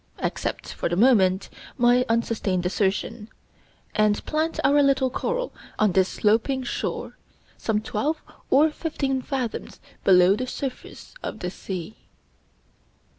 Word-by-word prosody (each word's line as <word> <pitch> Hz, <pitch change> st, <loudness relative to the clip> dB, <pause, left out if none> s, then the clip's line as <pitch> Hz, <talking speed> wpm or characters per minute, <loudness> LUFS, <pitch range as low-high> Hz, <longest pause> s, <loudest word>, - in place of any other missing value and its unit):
Accept, -, -, -3 dB
for -, -, -2 dB
the 175 Hz, -, 0 dB
moment, 195 Hz, -4 st, +4 dB, 0.3 s
my 245 Hz, 0 st, +4 dB
unsustained 220 Hz, -5 st, 0 dB
assertion, 205 Hz, +4 st, -1 dB, 0.6 s
and 210 Hz, -1 st, +2 dB
plant 315 Hz, +1 st, -1 dB
our 285 Hz, +2 st, +5 dB
little 270 Hz, -2 st, +3 dB
coral -, -, -2 dB, 0.2 s
on 215 Hz, -2 st, +3 dB
this 190 Hz, +1 st, +3 dB
sloping 230 Hz, +5 st, +1 dB
shore, 245 Hz, -, -4 dB, 0.4 s
some 220 Hz, -2 st, 0 dB
twelve 290 Hz, +9 st, -1 dB, 0.3 s
or 300 Hz, +4 st, +5 dB
fifteen 275 Hz, -5 st, -2 dB
fathoms 255 Hz, -4 st, -4 dB, 0.2 s
below 185 Hz, 0 st, +6 dB
the 255 Hz, +4 st, -3 dB
surface 265 Hz, 0 st, -6 dB
of -, -, -5 dB
the 180 Hz, -3 st, -4 dB
sea. 185 Hz, +1 st, -6 dB
230 Hz, 125 wpm, -25 LUFS, 200-270 Hz, 0.6 s, below